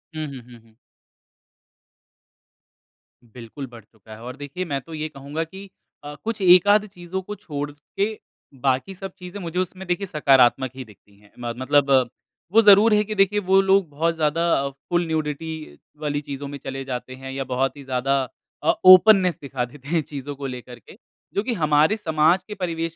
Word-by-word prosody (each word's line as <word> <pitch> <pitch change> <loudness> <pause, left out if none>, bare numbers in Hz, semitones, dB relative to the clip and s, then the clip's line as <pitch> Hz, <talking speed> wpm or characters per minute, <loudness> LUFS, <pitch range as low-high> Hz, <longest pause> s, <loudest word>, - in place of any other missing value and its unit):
हुँ, 155 0 -3
हुँ, 135 -3 -8
हुँ, 120 - -13
हुँ। 115 -1 -26 2.5
बिल्कुल 120 +4 -9
बढ़ 120 -3 -13
चूका 110 0 -20
है 110 - -14
और 125 +1 -7
देखिए, 145 +6 -6
मैं 140 -5 -2
तो 165 - -12
ये 155 0 -4
कहूँगा 145 +3 -5
की 190 +4 -11 0.3
अ, 145 0 -8
कुछ 225 -2 -3
एक-आध 200 +3 +6
चीज़ों 185 0 -6
को 210 +3 -7
छोड़ 145 -7 -5
के, 200 +9 -4 0.4
बाकी 135 +8 0
सब 195 +1 -7
चीज़ें 180 +2 -8
मुझे 175 +1 -3
उसमें 185 +1 -4
देखिये 180 +3 -1
सकारात्मक 135 -4 +3
ही 130 - -6
दिखती 105 -1 -21
हैं। 105 0 -23
म 120 - -7 0.2
मतलब 140 +1 +3 0.6
वो 225 +3 +6
ज़रूर 210 +1 +7
है 210 0 +4
कि 215 +1 -5
देखिए, 195 +1 +3
वो 190 -1 +3
लोग 195 -3 +3
बहुत 165 +3 -1
ज़्यादा 155 -2 +1
फुल 175 +6 -2
न्यूडिटी 160 0 -4 0.2
वाली 145 -1 -1
चीज़ों 140 0 -6
में 140 0 -7
चले 135 0 -5
जाते 130 0 -5
हैं 135 0 -8
या 135 0 -3
बहुत 130 +1 -1
ही 140 - -10
ज़्यादा 130 +1 0 0.5
अ, - - +2 0.2
ओपननेस 185 -1 +8
दिखा 135 -3 -3
देते 135 +2 -15
हैं 165 0 +2
चीज़ों 145 -1 -7
को 140 0 -7
लेकर 125 -1 -8
के, - - -17 0.4
जो 200 - 0
कि 240 +1 -1
हमारे 155 +2 +3
समाज 160 0 +2
के 210 - -6
परिवेश 165 -3 -3
150 Hz, 185 wpm, -23 LUFS, 135-185 Hz, 2.5 s, ओपननेस